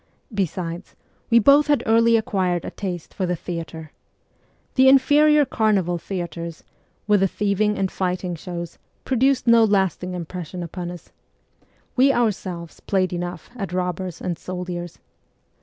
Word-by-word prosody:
Besides, 180 -2 -3 0.3
we 235 - +5
both 280 +7 +6
had 290 -1 +2
early 230 +1 +4
acquired 185 -5 -1
a - - -5
taste 180 -5 -5
for 185 - -2
the 180 - 0
theatre. 165 -2 -7 0.8
The 265 0 +6
inferior 290 +2 +5
carnival 200 -8 +1
theatres, 170 -2 -5 0.4
with 210 -1 +4
the 195 - +3
thieving 210 +2 0
and 190 -1 -1
fighting 180 -1 -2
shows, 170 0 -7 0.3
produced 265 +1 +2
no 235 -1 +6
lasting 190 -3 +1
impression 175 0 -6
upon 175 +1 -5
us: 175 -1 -10 0.8
we 265 +2 +5
ourselves 190 -9 -2
played 185 -2 0
enough 175 -1 -5
at 195 -6 -5
robbers 180 -1 -3
and 175 -3 -3
soldiers. 180 -1 -6
185 Hz, 135 wpm, -22 LUFS, 175-220 Hz, 0.8 s, both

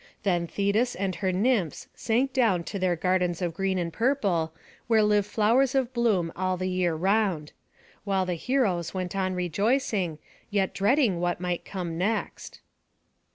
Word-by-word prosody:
Then 175 -3 +1
Thetis 205 +7 0
and 190 0 -2
her 185 +2 0
nymphs 195 - 0
sank 250 +4 0
down 215 -9 +2
to 200 +3 -5
their 185 -1 +1
gardens 180 0 0
of 175 -3 -2
green 190 +2 -1
and 170 -2 -2
purple, 200 - +1 0.4
where 225 -2 +4
live 210 -1 +2
flowers 240 +6 +2
of 260 -1 0
bloom 210 -9 +1
all 185 0 -1
the 185 +1 -2
year 180 -2 +1
round; 190 -3 0 0.5
while 195 -2 0
the 180 - -1
heroes 185 - 0
went 185 0 -3
on 185 -1 -1
rejoicing, 195 - 0 0.3
yet 200 -2 0
dreading 210 - +2
what 175 0 -1
might 180 -1 -3
come 175 -4 -5
next. 215 +5 -3
190 Hz, 155 wpm, -27 LUFS, 175-220 Hz, 0.5 s, where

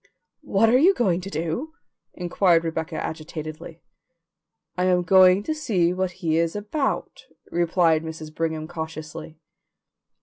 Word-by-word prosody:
"What 205 +3 +2
are 250 +3 +5
you 370 +7 +5
going 185 -6 +1
to 190 - -7
do?" 170 - -3 0.4
inquired 175 -1 +2
Rebecca 160 0 -3
agitatedly. 155 +1 -6 0.9
"I 180 0 0
am 180 -1 +3
going 185 +2 +6
to 315 - -2
see 200 - +1
what 185 0 -1 0.2
he 160 0 +2
is 165 +1 0
about," 240 +8 -3 0.2
replied 170 -2 +2
Mrs. 160 -1 -8
Brigham 160 -1 -2
cautiously. 160 -1 -7
170 Hz, 130 wpm, -24 LUFS, 160-190 Hz, 0.9 s, going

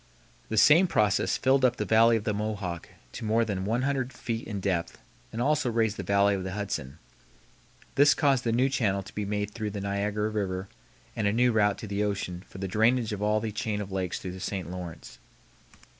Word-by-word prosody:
The 110 - -2
same 160 - +6
process 105 - +2
filled 135 0 +2
up 125 -1 +4
the 105 - -3
Valley 115 +2 +5
of 105 - -5
the 105 - -1
Mohawk 100 -5 -4 0.2
to - - -8
more 110 +1 +2
than 95 -3 -3
100 130 +4 0
feet 115 -4 -5
in 105 -3 -4
depth 95 -3 -2 0.3
and 115 - -5
also 145 0 +1
raised 110 -2 +1
the - - -5
Valley 100 0 +3
of 95 -2 -2
the 95 0 -4
Hudson. 95 -9 -4 1.0
This 145 +1 +5
caused 135 -4 +2
the 115 - 0
new 125 +3 +3
channel 105 -8 0
to 95 - -13
be 105 - -3
made 105 0 -2
through 110 -1 -4
the 100 0 -5
Niagara 100 +2 -1
River 95 -3 -3 0.5
and 105 -2 0
a - - +3
new 120 +3 +3
route 105 -2 +2
to 110 - -7
the 100 +1 -1
ocean 95 -3 -3
for - - -12
the 95 0 -3
drainage 110 +3 +2
of 100 - -5
all 105 +1 +2
the 110 0 -3
chain 105 0 -2
of 100 -1 -6
lakes 95 -2 -2
through 90 - -6
the 95 - -8
St. 90 -2 -4
Lawrence. 85 -8 -8
105 Hz, 215 wpm, -28 LUFS, 100-115 Hz, 1.0 s, same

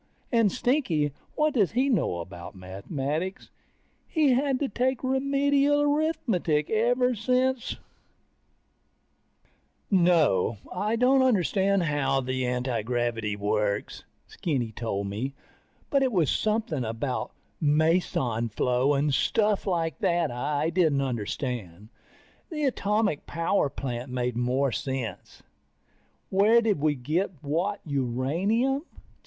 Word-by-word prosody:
And 230 -5 +3
Stinky, 195 - 0 0.2
what 305 -1 +2
does 215 - +2
he 255 +3 +2
know 210 - 0
about 85 +1 -9
mathematics? 140 - -4 0.6
He's 295 -6 +3
had 270 0 +1
to 285 - +1
take 255 +2 -1
Remedial 280 +2 +2
Arithmetic 265 - 0
ever 245 +3 +2
since... 255 +3 0 2.2
No, 165 - +3 0.2
I 210 +5 0
don't 255 +3 +4
understand 200 -5 +2
how 145 -3 +1
the 130 -1 -2
antigravity 120 -3 -1
works. 105 0 -1 0.2
Skinny 130 -9 -2
told 105 -3 -3
me, 115 +8 -4 0.6
but 275 - +3
it 265 -1 +2
was 175 - +2
something 215 - 0
about 115 +4 -3 0.3
meson 150 -7 +1
flow 125 +6 +1
and 145 +1 +1
stuff 210 +7 +1
like 165 -5 -1
that 170 -2 +1
that - - -6
I 145 +6 -1
didn't 160 -6 +2
understand. 110 - -4 0.6
The 305 -2 -3
atomic 210 - 0
power 165 -1 +1
plant 125 -1 -5
made 125 -1 -1
more 125 +3 +1
sense. 130 -1 -5 0.9
Where 210 +5 +5
did 220 -7 +1
we 150 0 +2
get 155 +9 -1
what 175 +8 -1
uranium? 165 - 0
160 Hz, 115 wpm, -27 LUFS, -, 2.2 s, Where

